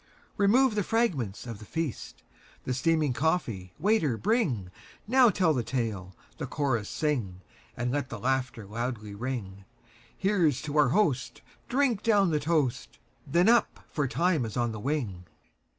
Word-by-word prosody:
Remove 230 +5 +4
the 210 - +1
fragments 175 - -1
of 115 -4 -7
the - - -10
feast! 160 +3 -5 0.4
The 130 - -2
steaming 150 +1 +1
coffee, 120 - -1
waiter, 190 - +2
bringNow 215 - +1
tell 180 -4 +2
the 130 - 0
tale, 110 -6 -3 0.2
the - - -3
chorus 130 -8 -1
sing, 115 - -2 0.4
And 120 0 -1
let 135 -1 -2
the 115 - -5
laughter 130 -1 -1
loudly 110 0 -4
ring; 100 -4 -5 0.5
Here 195 -4 +3
's 130 - -5
to 150 -1 -5
our 145 -3 +5
host, 130 - 0 0.3
drink 250 -4 +2
down 200 -5 +3
the 150 - +1
toast, 140 -6 -1 0.3
Then 170 +7 +3
up! 235 +1 +3
for 150 -3 0
time 170 +1 +1
is 110 0 -5
on 120 -1 +1
the 110 - -6
wing. 115 -9 -3
135 Hz, 150 wpm, -28 LUFS, 115-180 Hz, 0.5 s, our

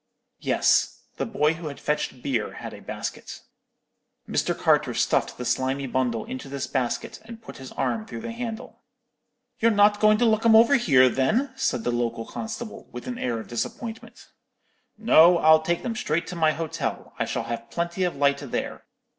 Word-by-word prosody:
"Yes. - - +2
The - - -2
boy 160 -8 +1
who 165 -1 -7
had 140 - -7
fetched 140 -4 -2
beer 120 -6 -1
had - - -8
a - - -11
basket. - - -6 0.9
Mr. - - 0
Carter - - +2
stuffed - - +1
the 125 - -5
slimy 135 +3 0
bundle 125 -3 -1
into 130 +1 -7
this 140 -1 -3
basket, 125 -3 -3
and 225 0 -10
put 225 - -11
his 130 -1 -10
arm 220 -1 -2
through - - -7
the 230 0 -5
handle. 230 -1 -7 0.8
"'You're 230 - +4
not 205 -1 +4
going 215 0 +5
to 240 - +2
look 220 -1 +2
'em 230 -1 +6
over 230 +5 +6
here, 140 - +5
then?' 215 - +1
said 120 - -1
the 120 - 0
local 115 -1 -2
constable, 220 0 -7
with - - -8
an 250 -1 -5
air 120 -2 -1
of 110 - -9
disappointment. 225 - -6 0.7
"'No, 180 -6 +6
I'll 160 -1 +6
take 170 +2 -1
them 230 -2 -3
straight 170 -8 -1
to 180 - -6
my 160 -2 +3
hotel; 160 -1 -4
I - - +1
shall - - -3
have 115 0 -6
plenty 170 +2 -2
of 180 -4 -1
light 140 0 +2
there. 140 - -5
165 Hz, 185 wpm, -25 LUFS, -, 0.9 s, em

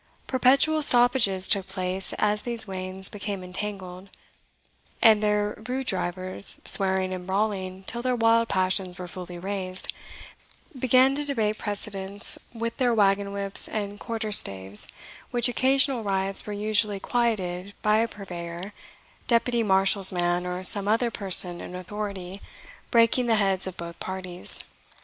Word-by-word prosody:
Perpetual 275 +4 +2
stoppages 240 -8 +3
took 195 -1 +1
place 185 0 -3
as 210 0 -1
these 235 -2 -5
wains 190 -1 -4
became 200 -2 -6
entangled; 185 0 -7 0.9
and 220 -2 +5
their 210 0 -1
rude 260 +1 -3
drivers, 185 -1 +3
swearing 190 -1 +2
and 180 -1 -8
brawling 190 -1 -3
till 235 +5 -5
their 255 0 -1
wild 230 0 +2
passions 185 -1 -1
were 180 -1 -8
fully 180 0 -9
raised, 185 0 -5 0.9
began 255 +2 +3
to 290 +1 -2
debate 220 -7 -1
precedence 205 -1 +2
with 230 0 -5
their 245 -2 +1
wagon 200 -1 +1
whips 200 0 -1
and 205 -1 -5
quarterstaves, 105 - +2 0.4
which 240 0 +3
occasional 265 +1 +2
riots 195 0 -2
were 210 - -5
usually 210 0 -1
quieted 200 -5 -3
by 215 0 +3
a 230 - +1
purveyor, 180 -2 -9 0.5
deputy 235 0 +1
marshal's 195 -1 +3
man, 175 0 -1
or 180 +1 -5
some 200 +2 +4
other 230 +3 0
person 185 -4 +3
in 180 - -9
authority, 195 0 -7 0.5
breaking 235 +1 +2
the 225 - +2
heads 195 -3 +1
of 185 - -8
both 170 0 -8
parties. 185 -1 +2
200 Hz, 135 wpm, -24 LUFS, 185-225 Hz, 0.9 s, and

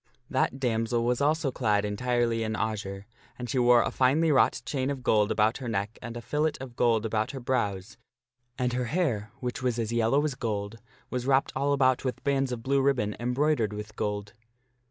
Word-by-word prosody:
That 135 - 0
damsel 115 -1 0
was 125 +2 +1
also 150 -1 +2
clad 105 -5 +1
entirely 115 +2 0
in 110 0 -1
azure, 100 -3 -3 0.3
and 125 - -5
she 125 +2 0
wore 120 -1 +6
a - - -2
finely 150 +5 +3
wrought 135 -3 +3
chain 135 -2 -1
of 135 -3 -4
gold 105 -2 +3
about 110 +1 +2
her 130 - -5
neck 105 0 -3
and 120 0 -6
a - - -6
fillet 150 +5 0
of 130 -2 -8
gold 115 -2 +2
about 110 0 0
her 135 - -5
brows, 110 -6 -2 0.6
and 125 -1 0
her 125 0 -1
hair, 120 - -1
which 125 0 -3
was 125 -2 0
as 115 -1 -2
yellow 115 +5 +2
as 150 - -1
gold, 110 -2 -4 0.3
was 125 0 -2
wrapped 135 0 +2
all 140 +2 +1
about 130 -2 +3
with 130 -2 -3
bands 135 -2 +1
of 115 -2 -4
blue 140 +1 +2
ribbon 125 -7 +1
embroidered 125 -2 +1
with 105 +1 -7
gold. 105 -1 -3
120 Hz, 195 wpm, -28 LUFS, 110-135 Hz, 0.6 s, wore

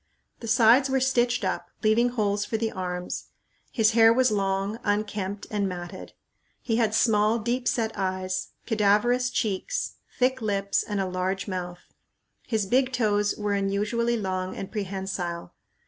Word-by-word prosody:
The 230 - -7
sides 235 +4 +5
were 265 0 +2
stitched 245 -2 +1
up, - - -2
leaving 225 +3 +4
holes 205 -4 0
for 220 +2 -2
the 225 0 -1
arms. 180 -1 -4 0.5
His 225 -2 +3
hair 225 0 +6
was 255 0 +3
long, 195 +1 -1
unkempt, 205 -1 -2
and 205 -2 0
matted. 175 -1 -7 0.5
He 225 -2 -1
had 220 -2 +2
small, 215 0 +3
deep 240 +3 -2
set 225 -2 0
eyes, 185 -1 -2 0.2
cadaverous 225 +3 +2
cheeks, 230 - -2 0.2
thick 260 0 +1
lips, 200 -2 0
and 205 -2 -3
a 195 - 0
large 185 +2 -2
mouth. 180 -2 -6 0.5
His 220 -3 0
big 255 +6 +2
toes 210 -4 +1
were 210 -1 -1
unusually 210 +4 0
long 185 -2 -3
and 195 - -6
prehensile. 190 -4 -4
210 Hz, 145 wpm, -26 LUFS, 195-235 Hz, 0.5 s, hair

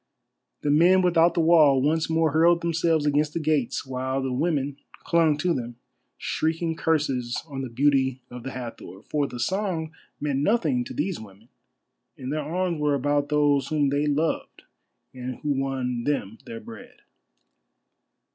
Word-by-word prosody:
The 145 - +1
men 180 +5 +5
without 170 -1 +4
the 170 - +3
wall 155 -5 +5
once 155 +4 +1
more 160 -1 +2
hurled 170 +3 +4
themselves 165 -2 +1
against 150 +1 +1
the - - 0
gates, 150 -6 0
while 130 0 -2
the 130 -1 -2
women 140 -1 -1 0.3
clung 165 -3 +3
to 175 +3 +1
them, 120 -3 -4 0.4
shrieking 160 +1 -1
curses 135 -7 0
on 135 -3 -5
the 130 - -5
beauty 130 +1 +2
of 125 0 -8
the 135 - -6
Hathor, 115 -6 -8
for 145 -2 -1
the 125 - -8
song 175 - -2 0.3
meant 145 -2 -1
nothing 235 - +1
to - - -8
these 190 -3 -2
women, 110 +2 -14 0.7
and 130 +2 -5
their 155 - -1
arms 175 -1 -2
were 145 -1 +2
about 145 +1 0
those 145 -2 +2
whom 150 -3 +1
they 145 +2 0
loved 150 +2 -1 0.5
and 125 0 -5
who 150 - 0
won 125 -3 -2
them 115 -7 -2
their 230 -1 -6
bread. 240 +2 -12
150 Hz, 160 wpm, -25 LUFS, 130-165 Hz, 0.7 s, men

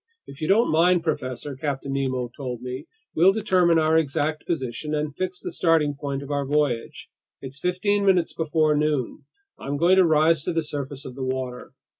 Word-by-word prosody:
"If 140 +3 -12
you 155 - -1
don't 225 +5 +3
mind, 170 +2 +3
professor," 140 -3 -3
Captain 140 0 -3
Nemo 130 -3 -2
told 125 -4 -6
me, 130 +4 -6 0.3
"we'll 180 +4 +5
determine 185 -5 +3
our 160 0 +3
exact 155 +1 -2
position 150 -1 -3
and 150 -1 -3
fix 185 +1 -4
the - - -4
starting 160 -4 +2
point 140 -1 -4
of 140 - -8
our 140 -1 0
voyage. 140 -4 -1 0.3
It's 135 +1 -9
fifteen 200 +4 0
minutes 185 -4 +2
before 155 -1 +1
noon. 150 -4 -1 0.3
I'm 140 +1 -3
going 175 +5 +4
to 190 - +7
rise 160 0 +3
to 180 - -1
the 165 -1 0
surface 145 -2 -5
of 130 - -7
the 130 +1 -6
water." 130 -1 -4
150 Hz, 185 wpm, -24 LUFS, 135-165 Hz, 0.3 s, to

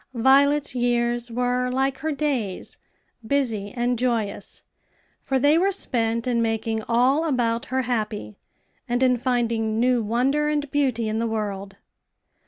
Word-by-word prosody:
Violet's 280 +4 +3
years 240 -1 0
were 250 +1 0
like 265 +1 0
her 315 - -2
days 270 -10 -3 0.5
busy 225 -8 -1
and 245 -1 -1
joyous; 230 -5 -2 0.6
for 270 - 0
they 290 +5 +4
were 390 +2 +2
spent 230 - -1
in 240 -2 +1
making 225 0 -1
all 255 +6 +3
about 240 -6 0
her 260 0 -1
happy, 215 - -3 0.5
and 245 +2 +1
in 250 -1 +4
finding 230 -3 0
new 245 0 +3
wonder 260 +7 +1
and 295 -1 -1
beauty 255 -6 0
in 215 +1 -1
the 230 - 0
world. 200 -3 -4
245 Hz, 140 wpm, -24 LUFS, 225-265 Hz, 0.6 s, they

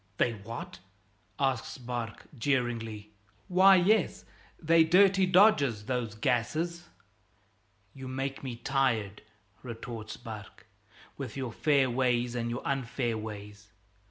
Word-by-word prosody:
"They're 120 - +2
what?" 115 -1 -8 0.6
asks 135 -4 -1
Barque 120 -3 -5
jeeringly. 115 -5 -2 0.4
"Why, 190 +1 +7
yes, 190 +2 +2 0.3
they're 165 0 +5
dirty 190 +3 +5
dodges, 150 - +4
those 120 -3 -2
gases 155 +10 -1 0.6
" 95 0 -40
"You 135 -1 -9
make 135 +1 -4
me 130 -3 -4
tired," 115 -5 0 0.4
retorts 115 -2 -7
Barque, 110 -4 -10 0.5
"with - - -6
your 130 -3 -3
fair 140 +2 +2
ways 120 -1 +1
and 120 -1 -2
your 120 - -4
unfair 125 -3 -1
ways. 105 -1 -8
125 Hz, 115 wpm, -29 LUFS, 110-140 Hz, 0.6 s, Why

